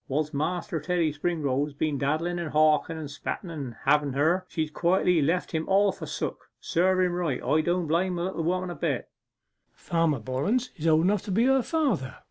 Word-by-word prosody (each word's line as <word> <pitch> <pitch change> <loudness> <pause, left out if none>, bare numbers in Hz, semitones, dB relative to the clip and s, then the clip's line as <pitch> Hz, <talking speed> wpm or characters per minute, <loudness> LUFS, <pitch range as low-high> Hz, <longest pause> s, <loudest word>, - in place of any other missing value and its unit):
Whilst 150 +2 -1
Master 165 +3 -2
Teddy 165 -1 0
Springrove 145 -3 0
has 150 - -9
been 145 -1 -1
daddlen, 160 +5 -1
and 160 - -5
hawken, 155 +1 +3
and 155 -2 -5
spetten 155 +5 -5 0.2
about 120 - -10
having 145 -1 +3
her, 170 +7 +1
she's 155 -2 -2
quietly 180 0 +2
left 165 +6 0
him 160 -1 -2
all 200 +1 +4
forsook. - - -5
Serve 185 +2 +2
him 180 -1 +1
right. 170 -7 -1
I 155 - +2
don't 175 +2 0
blame 175 +4 +1
the 170 - -2
little 180 -2 -2
woman 180 +2 -1
a - - -6
bit.' - - -2 0.7
'Farmer 165 -5 0
Bollens 145 - -1
is 165 -2 -3
old 160 0 +4
enough 200 +1 +2
to 205 - -4
be 225 +6 +3
her 265 0 +4
father! 240 - -1
165 Hz, 195 wpm, -27 LUFS, 150-180 Hz, 0.7 s, all